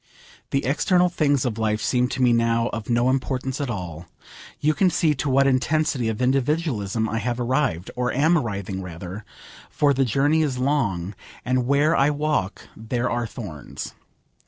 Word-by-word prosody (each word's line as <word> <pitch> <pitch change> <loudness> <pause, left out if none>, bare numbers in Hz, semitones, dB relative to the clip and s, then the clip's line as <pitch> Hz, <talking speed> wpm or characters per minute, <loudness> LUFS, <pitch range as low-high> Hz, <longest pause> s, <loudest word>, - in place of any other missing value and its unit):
The 135 - 0
external 180 +6 +3
things 145 -6 +1
of 115 -3 -2
life 110 -1 0
seem 125 +2 +1
to 130 - -2
me 120 -1 +5
now 115 0 +2
of 115 -1 -6
no 120 +1 +2
importance 130 +1 -2
at 140 - -2
all. 90 -6 -6 0.5
You 155 +1 +2
can 185 +3 +3
see 160 -2 +2
to 140 +1 -2
what 135 +1 +4
intensity 135 -1 +1
of 110 +3 -2
individualism 125 - 0
I 115 +1 -2
have 120 +2 -2
arrived 125 - 0
or 125 0 0
am 155 +6 +3
arriving 100 - -2
rather, 90 +3 -7 0.5
for 145 -1 +2
the 135 0 +2
journey 140 +6 +2
is 140 -5 0
long, 115 -10 0 0.3
and 125 -1 +1
'where 145 +4 +3
I 140 +2 +4
walk 150 -9 -1
there 120 +3 -2
are 120 0 -1
thorns.' 95 - -8
125 Hz, 170 wpm, -23 LUFS, 110-145 Hz, 0.5 s, me